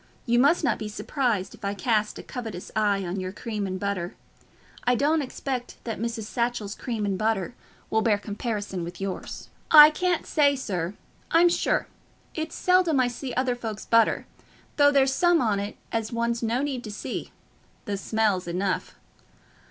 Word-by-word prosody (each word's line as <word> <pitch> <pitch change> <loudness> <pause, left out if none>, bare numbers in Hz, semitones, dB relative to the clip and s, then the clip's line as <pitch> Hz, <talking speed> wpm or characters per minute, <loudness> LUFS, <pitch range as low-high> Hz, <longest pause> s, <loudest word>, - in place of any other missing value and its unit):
You 240 0 +3
must 285 +7 +4
not - - +1
be 215 - -4
surprised 220 -3 -1
if - - -16
I 200 0 -1
cast 215 +1 0
a - - -8
covetous 225 -8 -7
eye 205 -3 +2
on 180 +3 -3
your 185 0 -4
cream 210 0 -4
and 185 0 -4
butter. 200 -2 -3 0.7
I 245 0 +3
don't 300 +5 +2
expect 255 -2 -4
that 225 -2 -4
Mrs. 230 0 -3
Satchell's 235 -2 -2
cream 225 -4 -3
and 195 -2 -1
butter 215 -1 0 0.4
will 220 - +3
bear 220 -2 +3
comparison 205 -3 -4
with 175 +1 -7
yours." 195 -1 -5 0.2
"I 300 -1 +10
can't 360 +1 0
say, 285 -2 +3
sir, 190 -7 -3 0.3
I'm 340 +1 +5
sure. 345 - +1 0.5
It's 315 0 -4
seldom 360 -5 +3
I 250 -1 +3
see 250 +1 -6
other 255 0 +1
folks's 225 -3 -6
butter, 230 -1 +3 0.5
though 285 -1 +7
there's 270 -1 +3
some 350 +2 +4
on 215 -6 +1
it 200 +1 -5
as 225 -1 -2
one's 235 0 -1
no 235 +4 0
need 265 -4 -3
to 215 - -6
see—the 205 0 -7
smell's 200 -3 0
enough." 185 +2 -2
225 Hz, 170 wpm, -26 LUFS, 200-260 Hz, 0.7 s, I